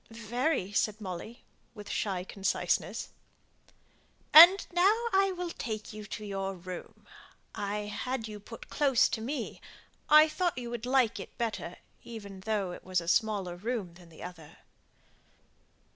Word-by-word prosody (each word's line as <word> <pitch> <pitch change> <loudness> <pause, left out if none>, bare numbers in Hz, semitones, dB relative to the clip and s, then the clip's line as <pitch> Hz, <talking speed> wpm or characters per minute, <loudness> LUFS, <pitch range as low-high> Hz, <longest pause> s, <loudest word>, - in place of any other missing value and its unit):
"Very," 230 - -1
said 210 +1 0
Molly, 200 +5 -7 0.3
with 205 -1 -10
shy 190 -4 -2
conciseness. 195 +1 -1 1.2
"And 350 +5 +10
now 360 +3 +5 0.2
I 390 0 +4
will 360 -2 -4
take 215 -6 -5
you 215 0 -8
to 210 +1 -7
your 195 -1 -3
room; 180 0 -9 0.5
I 205 +1 -3
have 205 0 -6
had 245 -4 -2
you 210 -1 -8
put 230 +3 -11
close 275 -5 +4
to 220 - -3
me; 270 +6 -4 0.5
I 305 +1 +8
thought 350 +1 -1
you 240 -1 -5
would 240 0 -5
like 255 -4 +2
it - - -10
better, 220 -6 -3 0.3
even 200 -4 -9
though 200 -2 -1
it - - -9
was 185 -1 0
a 170 - -8
smaller 200 -3 +1
room 205 -2 -4
than 175 -1 -16
the 160 - -12
other." 165 -4 -10
215 Hz, 150 wpm, -30 LUFS, 190-250 Hz, 1.2 s, And